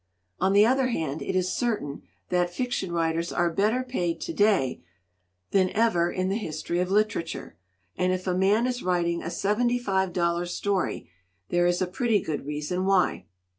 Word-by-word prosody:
"On 190 +2 +2
the 205 +1 +7
other 260 +2 +3
hand, 160 - -2
it - - -3
is 185 0 +1
certain 210 -13 -2 0.3
that 175 -1 +1
fiction 195 -3 -2
writers 165 0 0
are 175 -1 +1
better 215 +8 +1
paid 180 -10 -2
to 335 - -4
day 200 - +2 0.7
than 185 -2 +3
ever 175 -6 +2
in 185 0 -1
the 195 +2 0
history 165 -2 -3
of 180 0 0
literature, 200 - -1 0.4
and 180 0 +1
if 185 0 -2
a 185 - 0
man 200 +5 +3
is 250 0 -2
writing 170 -2 0
a 165 - -4
seventy 210 +7 +1
five 190 -5 0
dollar 170 0 0
story 195 +2 -2 0.4
there 175 0 +3
is 175 +1 +1
a - - +1
pretty 215 +4 +1
good 150 -5 -4
reason 150 +5 -2
why. 195 -2 +2
185 Hz, 175 wpm, -26 LUFS, 170-210 Hz, 0.7 s, the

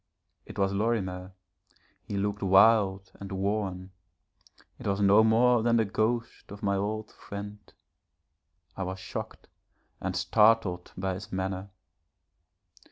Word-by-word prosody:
It - - -10
was 95 0 +1
Lorimer, 95 -4 -2 0.7
he 100 - -5
looked 105 +1 -2
wild 95 -1 +4
and 100 0 -8
worn; 95 -1 -2 0.9
it - - -6
was 100 0 0
no 100 +2 +6
more 115 +2 +4
than 115 +1 +2
the 115 -1 +3
ghost 115 +4 -2
of 100 +1 -10
my 100 -1 +1
old 105 +2 -3
friend. 105 +1 -8 1.2
I - - -6
was 95 0 -3
shocked - - -7 0.5
and 95 -1 -3
startled 100 -1 +2
by 95 0 -1
his 95 +2 -8
manner. 95 +1 -3
100 Hz, 125 wpm, -28 LUFS, 95-110 Hz, 1.2 s, no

